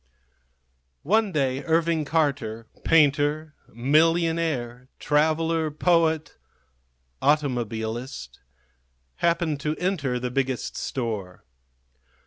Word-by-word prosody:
One 215 +4 +2
day 135 -3 0
Irving 165 -1 +1
Carter, 140 -8 -1 0.2
painter, 150 0 +2 0.2
millionaire, 150 -2 +1
traveller, 160 +2 +1
poet, 160 0 +1 0.8
automobilist, 120 - -1 0.8
happened 170 -3 +1
to 150 +2 -2
enter 160 -9 -1
the 125 0 -3
Biggest 130 -1 -2
Store. 105 -8 -4
150 Hz, 75 wpm, -25 LUFS, 125-165 Hz, 0.8 s, One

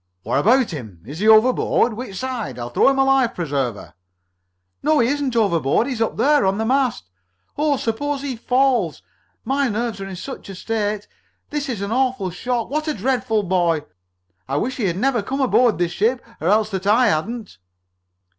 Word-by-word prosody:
"What - - 0
about 240 - +3
him? 110 - -8
Is 145 +7 -8
he 215 - +1
overboard? 225 +1 +4
Which 225 -3 -7
side? 255 - -4
I'll 120 0 -6
throw 120 - +4
him 275 - +1
a 270 - +4
life 270 -3 +2
preserver!" 140 - -3 0.9
"No, 305 +2 +2
he 235 - +3
isn't 280 -2 -1
overboard! 180 - +2
He's 255 -5 -4
up 225 - -1
there! 290 +4 +3
On 190 +1 +1
the 220 - -1
mast! 255 - 0 0.5
Oh! 295 -1 +1
Suppose 275 +5 -2
he 270 -3 -3
falls! 255 +2 +1 0.4
My 275 0 +1
nerves 220 -1 -3
are 195 - -5
in 190 - -7
such 260 +4 -8
a 195 - -7
state! 210 0 -2 0.4
This 295 -2 -3
is 225 -6 -3
an 200 - -4
awful 250 -6 0
shock! 240 +6 -3
What 310 +2 -1
a 305 - -1
dreadful 245 -4 0
boy! 175 -4 +1 0.6
I 135 - -1
wish 250 - -2
he 230 - -1
had 175 -2 -1
never 250 +1 +1
come 265 +7 -4
aboard 250 - +3
this 175 0 0
ship, 230 +8 0 0.2
or 160 - -1
else 215 +2 +3
that 190 0 -3
I 230 +3 +5
hadn't!" 210 - -3
225 Hz, 190 wpm, -21 LUFS, 190-260 Hz, 0.9 s, I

